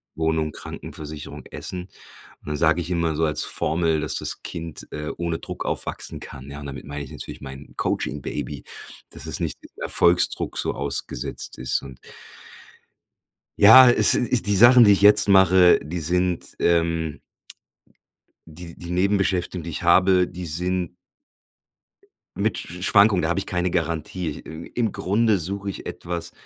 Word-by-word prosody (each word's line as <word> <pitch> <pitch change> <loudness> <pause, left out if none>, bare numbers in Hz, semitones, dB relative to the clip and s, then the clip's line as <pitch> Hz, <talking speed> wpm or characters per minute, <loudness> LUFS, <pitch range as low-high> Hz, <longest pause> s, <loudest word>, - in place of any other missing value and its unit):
Wohnung, 80 -1 -1
Krankenversicherung, 75 0 -8
Essen. 90 -1 -6 0.6
Und - - -20
dann 75 0 -3
sage 80 +3 +2
ich 85 - -6
immer 85 -2 -1
so 80 - -1
als 75 -1 0
Formel, 80 -1 0
dass 75 - -1
das - - -2
Kind, 80 -2 -7
äh, 75 0 -5
ohne 85 -1 -3
Druck - - -7
aufwachsen - - -4
kann, 70 0 -10
ja, 70 - -8
und - - -9
damit 70 0 -8
meine 70 0 -6
ich - - -14
natürlich - - -9
mein 65 +1 -11
Coaching-Baby, 70 -1 -4 0.5
dass - - -9
es - - -3
nicht - - -3 0.2
Erfolgsdruck 85 +1 +3
so - - +1
ausgesetzt 70 -3 -1
ist. 65 -1 -1
Und 65 -2 -12 1.6
ja, 115 +5 +9
es 120 - +6
ist 125 -2 0
die 105 - +3
Sachen, 120 +4 +7
die 105 - +6
ich 100 - +3
jetzt 105 +1 +6
mache, 95 -2 +5
die 80 +4 -5
sind, 90 +2 -1
ähm 85 -2 0 1.3
die 85 +1 -10
die 85 0 -9
Nebenbeschäftigung, 95 -1 0
die 85 - -7
ich 80 - -5
habe, 90 +1 +4
die 90 0 -8
sind 90 +2 -2 1.4
mit 105 0 -1
Sch 90 +2 -8
Schwankung, 100 -1 +4
da 80 - -1
habe 85 +2 0
ich - - -5
keine 90 0 -2
Garantie. 85 -1 -3
Im 80 +1 -10
im 115 -3 -1
Grunde 105 +2 +1
suche 100 +4 -3
ich 95 - -8
etwas 85 0 -6
85 Hz, 155 wpm, -22 LUFS, 80-95 Hz, 1.6 s, ja